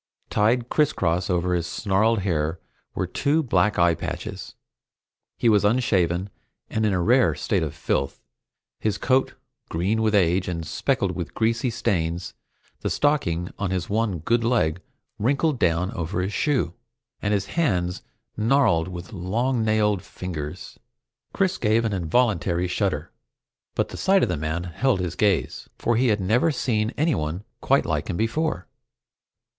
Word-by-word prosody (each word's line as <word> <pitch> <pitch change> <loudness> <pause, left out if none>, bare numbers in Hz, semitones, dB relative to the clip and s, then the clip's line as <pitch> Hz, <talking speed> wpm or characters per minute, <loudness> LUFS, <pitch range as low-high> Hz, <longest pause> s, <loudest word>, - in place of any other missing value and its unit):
Tied 115 +3 +2
crisscross 95 - +1
over 90 0 +1
his 85 -1 0
snarled 110 +1 +1
hair 80 -3 -1 0.4
were - - 0
two 155 +3 +1
black 105 -4 +2
eye 85 -1 +4
patches. - - -6 0.8
He - - +1
was 105 -3 +5
unshaven 100 -5 +1 0.4
and 110 0 +1
in - - +1
a 95 - +1
rare 120 +8 +3
state 100 -5 0
of 80 -3 -3
filth, 70 0 -1 0.6
his 105 -2 0
coat 130 +4 +1 0.3
green 95 +7 0
with 110 -1 +2
age 90 -1 +3
and 85 -2 -3
speckled - - 0
with - - -6
greasy 115 +2 +1
stains, 85 -5 -1 0.5
the - - -2
stocking 90 - 0
on 100 -2 -1
his 90 0 -2
one 110 -3 0
good 115 +9 +1
leg 90 -8 +1 0.4
wrinkling 140 +6 +1
down 90 -1 +1
into 85 +2 -4
his 95 +3 -1
shoe, 135 - 0 0.5
and 100 - 0
his 100 -1 +1
hands 90 - 0 0.3
gnarled 110 -8 +3
with 90 +2 -8
long 115 +7 0
nailed 105 -3 +2
fingers. 85 -2 -7 0.5
Chris 190 -1 0
gave 110 +1 +2
an 110 - 0
involuntary 90 -1 +1
shudder, 90 - -1 0.6
but - - 0
the - - -8
sight 195 0 +3
of - - +1
the - - 0
man 80 +3 -2
held 95 +6 0
his 90 -2 -2
gaze, 100 -5 0
for 120 - +1
he 125 +3 +3
had 105 -3 +2
never 110 - +2
seen 110 -7 0
anyone 95 - 0 0.2
quite - - +3
like - - -2
him - - -2
before. 115 - -1
100 Hz, 150 wpm, -24 LUFS, 90-115 Hz, 0.8 s, was